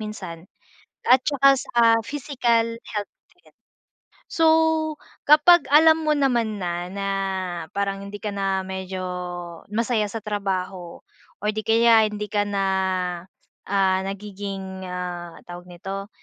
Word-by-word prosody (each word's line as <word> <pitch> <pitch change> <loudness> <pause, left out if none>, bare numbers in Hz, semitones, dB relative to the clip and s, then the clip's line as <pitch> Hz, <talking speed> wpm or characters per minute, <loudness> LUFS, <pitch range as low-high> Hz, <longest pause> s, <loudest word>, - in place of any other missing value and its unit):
minsan 190 -6 -7 0.7
at 255 +1 +7
saka 275 -2 +3
sa 240 -2 0 0.2
physical 235 -5 0
health 210 -2 -5 0.3
din. - - -24 0.8
So, 325 -1 +3 0.8
kapag 320 +3 +7
alam 320 +2 +6
mo 305 - +3
naman 235 -6 +1
na, 175 -1 -3
na 195 +1 -4 0.7
parang 195 -1 -1
hindi 200 +1 -7
ka 210 - -2
na 195 -1 -1
medyo 190 0 -5 0.7
masaya 225 -1 0
sa 225 - -4
trabaho 190 -4 -4 0.4
or 210 - -1
'di 215 0 -3
kaya 225 -1 +5
hindi 210 -1 -5
ka 205 -1 +1
na, 200 -1 -1 1.0
ah, 190 -1 +2
nagiging, 195 -1 -6
ah, 175 -2 -6
tawag 175 0 -10
nito, 195 +3 -7
205 Hz, 120 wpm, -23 LUFS, 190-230 Hz, 1.0 s, at